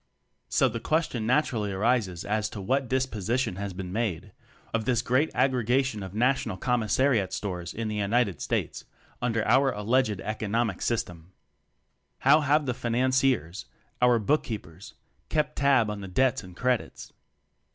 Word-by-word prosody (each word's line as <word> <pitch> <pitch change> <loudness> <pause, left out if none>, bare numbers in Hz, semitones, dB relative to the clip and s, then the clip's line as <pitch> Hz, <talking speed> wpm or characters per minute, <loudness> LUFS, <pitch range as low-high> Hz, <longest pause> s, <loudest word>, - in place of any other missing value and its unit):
So 135 - +3
the 115 -1 -4
question 130 -5 -1
naturally 120 -6 +1
arises 100 -3 0
as 105 0 -1
to 105 - -8
what 130 +7 0
disposition 125 -4 -1
has 100 0 -4
been 90 0 -6
made 105 -4 -2 0.4
of 115 -1 -1
this 120 -1 +1
great 130 +6 +2
aggregation 130 -2 +1
of 95 0 -8
National 125 -4 +1
Commissariat 120 -2 +1
Stores 90 -4 -4
in 115 0 -4
the 105 0 -3
United 105 -1 +1
States - - -2 0.4
under 115 -3 0
our 130 +4 +4
alleged 110 -1 0
"economic" 110 -1 -2
system? 90 -6 -3 0.9
How 140 +3 +6
have 150 +1 +2
the 125 - -1
"Financiers" 125 -6 0 0.3
our 125 -1 +5
book 140 +8 +2
keepers 90 -5 -8 0.3
kept 150 -1 0
tab 140 -5 +4
on 105 -1 -6
the 95 - -6
"debits 130 +6 +1
and 90 -1 -13
credits"? 125 -1 -2
115 Hz, 145 wpm, -27 LUFS, 100-130 Hz, 0.9 s, How